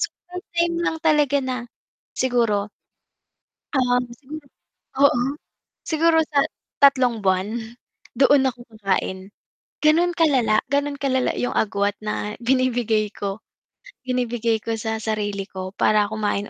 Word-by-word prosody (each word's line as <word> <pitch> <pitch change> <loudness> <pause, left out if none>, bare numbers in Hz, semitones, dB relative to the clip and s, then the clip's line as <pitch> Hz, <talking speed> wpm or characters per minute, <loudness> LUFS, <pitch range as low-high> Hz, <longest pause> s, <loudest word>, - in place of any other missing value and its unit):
So - - +1 0.2
may 360 - -4 0.2
time 340 0 +2
lang 320 - 0
talaga 300 -3 +3
na 260 -2 -2 0.6
siguro 230 -5 +1 1.0
ah, 250 -2 +2
siguro 290 +4 -10 0.5
oo, 275 -3 +4 0.7
siguro 320 0 +3 0.2
sa 285 - +5 0.4
3 255 -5 +4
buwan 190 +1 +1 0.7
doon 270 -1 +5
ako 245 -1 -12
kakain 190 -1 -2 0.6
ganun 340 +3 +4
kalala, 255 -10 +3
ganun 285 0 0
kalala 260 -2 +1
'yung 245 - -2
agwat 205 -1 0
na 210 0 -3
binibigay 245 -4 +1
ko, 200 +1 -4 0.7
binibigay 240 -3 0
ko 225 0 -3
sa 220 0 -3
sarili 205 -3 -2
ko 185 0 -6
para 210 -1 +3
kumain 205 -1 -2
245 Hz, 120 wpm, -22 LUFS, 210-280 Hz, 1.0 s, sa